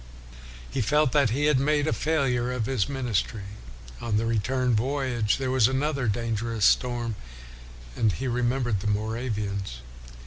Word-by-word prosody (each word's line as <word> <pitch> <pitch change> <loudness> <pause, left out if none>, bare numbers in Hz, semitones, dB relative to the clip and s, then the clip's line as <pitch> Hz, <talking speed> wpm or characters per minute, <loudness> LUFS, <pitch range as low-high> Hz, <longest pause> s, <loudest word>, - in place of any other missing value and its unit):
He 135 - -2
felt 150 +4 +3
that 140 -4 +3
he 140 +6 0
had 150 -3 +4
made 145 +1 +2
a - - +2
failure 130 -6 0
of 125 -3 -2
his 130 -2 0
ministry. 120 -6 -2 0.6
On 110 -3 0
the 110 - 0
return 125 +3 +1
voyage 125 -2 0
there 130 -1 -2
was 130 -4 +4
another 135 -1 0
dangerous 115 0 -1
storm, 120 -3 +2 0.8
and 110 - +2
he 130 - -3
remembered 120 -2 0
the 105 - -4
Moravians. 105 - -2
120 Hz, 145 wpm, -26 LUFS, 110-135 Hz, 0.8 s, had